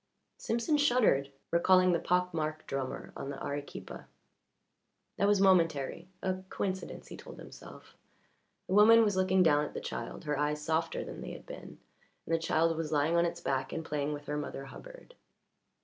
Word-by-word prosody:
Simpson 235 +7 0
shuddered, 235 - +3 0.2
recalling 185 +2 +5
the 170 - +2
pock 180 0 +1
marked 155 -1 -3
drummer 135 -1 -4
on 135 - -6
the 140 - -6
Arequipa. 145 0 -6 1.1
That 200 - +2
was 205 -1 +4
momentary 170 -4 +2 0.2
a 185 0 -1
coincidence, 190 -1 -4
he - - -8
told - - -11
himself. - - -13 0.7
The - - -3
woman 225 +3 +8
was 205 -3 +1
looking 185 0 +3
down 150 -3 +4
at 150 - -6
the - - -2
child, - - -6
her 150 -2 -2
eyes 150 0 0
softer 160 +2 -1
than - - -8
they - - -6
had - - -11
been, - - -10 0.5
and 165 - -2
the 165 - +3
child 165 0 +2
was 160 -2 -3
lying 150 +2 +2
on 170 0 +4
its 170 0 -6
back 135 -4 -1
and 160 - -4
playing 145 -1 -2
with 145 0 -6
her 150 0 -3
Mother 145 -2 -5
Hubbard. - - -12
165 Hz, 180 wpm, -31 LUFS, 150-185 Hz, 1.1 s, woman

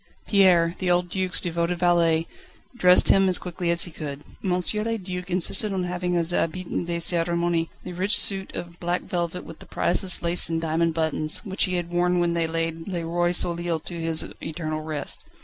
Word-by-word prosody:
Pierre, 180 -4 +4
the 185 - -1
old 175 0 +1
Duc's 185 -1 +1
devoted 170 0 -1
valet, 170 -2 +2 0.5
dressed 180 -6 +5
him 195 -1 +5
as 180 - +5
quickly 175 -1 -4
as 170 0 +5
he 175 - -7
could. 145 -2 -7 0.2
M. 190 - -1
le 210 +5 +1
Duc 180 -2 -6
insisted 190 +3 0
on 190 -2 -1
having 180 0 -2
his 170 0 +2
habit 175 +1 -2 0.2
de 170 0 -1
cérémonie, 170 0 0
the 180 - -7
rich 190 +4 +2
suit 195 -1 +2
of 170 0 -7
black 175 +1 -2
velvet 175 0 -3
with 165 - -11
the - - -13
priceless 180 0 0
lace 170 0 +3
and 165 0 -1
diamond 165 0 0
buttons, 160 +2 0
which 190 -1 +1
he 185 -1 -2
had 175 -1 -3
worn 175 0 +1
when 170 -1 +1
they 165 -1 0
laid 165 0 -3
le 175 -4 -3
Roi 175 +1 0
Soleil 170 -1 0
to 170 0 -7
his 165 -1 +1 0.2
eternal 155 -1 -4
rest. 155 -3 -5
175 Hz, 195 wpm, -24 LUFS, 165-180 Hz, 0.5 s, dressed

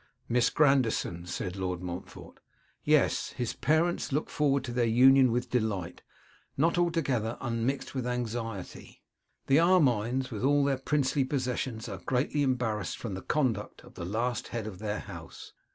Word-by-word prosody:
'Miss 120 0 +3
Grandison?' 125 - +2
said 90 +1 -4
Lord 90 -2 -3
Montfort. 90 0 -8 0.4
'Yes: - - +2
his 120 -2 -3
parents 160 +2 +1
looked 150 +3 -1
forward 140 -2 +1
to 120 - -5
their 120 0 +1
union 130 +2 +6
with 120 +1 -2
delight, 105 -8 -1 0.6
not 165 +5 +3
altogether 140 -10 0
unmixed 120 +2 -2
with 130 -2 -2
anxiety. 115 -5 -5 0.4
The 135 - +4
Armines, 130 - +3
with 110 0 -4
all 145 +1 +4
their 140 -2 +1
princely 135 0 +1
possessions, 125 -3 -2
are 95 -4 -6
greatly 130 +3 0
embarrassed 125 -6 -1
from 110 -5 -5
the 95 - -5
conduct 120 -8 -1
of - - -15
the 90 - -7
last 115 +6 -2
head 115 -3 -4
of 100 -4 -7
their 105 0 -3
house. 85 -5 -10
125 Hz, 150 wpm, -29 LUFS, 110-135 Hz, 0.6 s, union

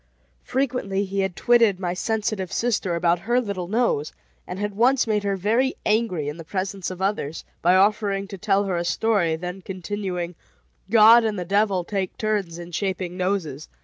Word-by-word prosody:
Frequently 240 -7 -1
had 195 0 -1
he - - -28
twitted 230 -6 +3
my 175 -2 -2
sensitive 210 -1 -2
sister 220 -7 0
about 170 0 +2
her 240 +7 +1
little 200 -7 -4
nose, 215 -8 0 0.4
and 180 - -5
had 205 +1 -3
once 250 +4 +3
made 215 -2 +1
her 200 -1 -1
very 230 +8 +1
angry 210 -9 +1
in 150 +2 -4
the 165 - -8
presence 190 +2 -3
of 185 0 -5
others, 180 -6 -2 0.2
by 180 +2 +4
offering 200 0 +2
to 195 - -8
tell 200 0 +2
her 190 -3 -1
a 170 - -1
story, 175 -2 +1
then 180 +3 -6
continuing: 185 -1 -4 0.6
"God 225 +2 +7
and 215 -2 -1
the 180 - -3
devil 200 -1 +1
take 190 0 -3
turns 205 -6 -1
in 175 0 -9
shaping 185 0 -3
noses. 180 -6 -2
195 Hz, 180 wpm, -23 LUFS, 180-215 Hz, 0.6 s, God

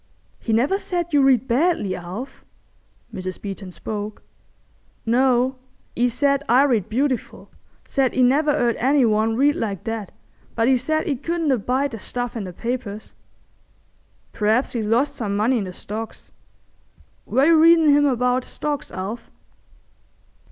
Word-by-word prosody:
"He 230 - -4
never 265 - +2
said 345 -4 -3
you 290 - +5
read 265 -2 +3
badly, 250 - +1
Alf?" 190 +10 -8 0.7
Mrs. 185 0 -5
Beeton 195 -2 -7
spoke. 210 +2 -6 0.8
"No. 255 +2 +2 0.4
'E 245 +1 +2
said 280 +3 +1
I 250 +4 +6
read 235 -9 +1
beautiful. 260 +2 -2 0.4
Said 270 -3 0
'e 255 - +3
never 285 +5 +3
'eard 240 -5 +1
any 270 +1 +3
one 220 0 +1
read 285 +4 +3
like 200 -5 -3
that, 225 -3 -4 0.5
but 230 0 +2
'e 265 - +5
said 310 +5 -1
'e 280 - 0
couldn't 330 +2 -1
abide 260 +4 0
the 225 - -7
stuff 245 +1 -4
in 220 -4 -4
the 180 - -6 0.2
papers." 220 -4 -4 1.2
"P'raps 220 +5 +1
he's 225 -3 -2
lost 240 +6 +1
some 205 -4 -2
money 235 +4 +2
in 200 - -3
the 185 - -6
Stocks. 215 +4 -8 1.0
Were 270 - +3
you 330 +1 +6
readin' 330 -1 +6
him 290 0 +5
about 250 0 +1
Stocks, 290 +1 -4
Alf?" 200 +5 -6
245 Hz, 150 wpm, -22 LUFS, 220-280 Hz, 1.2 s, I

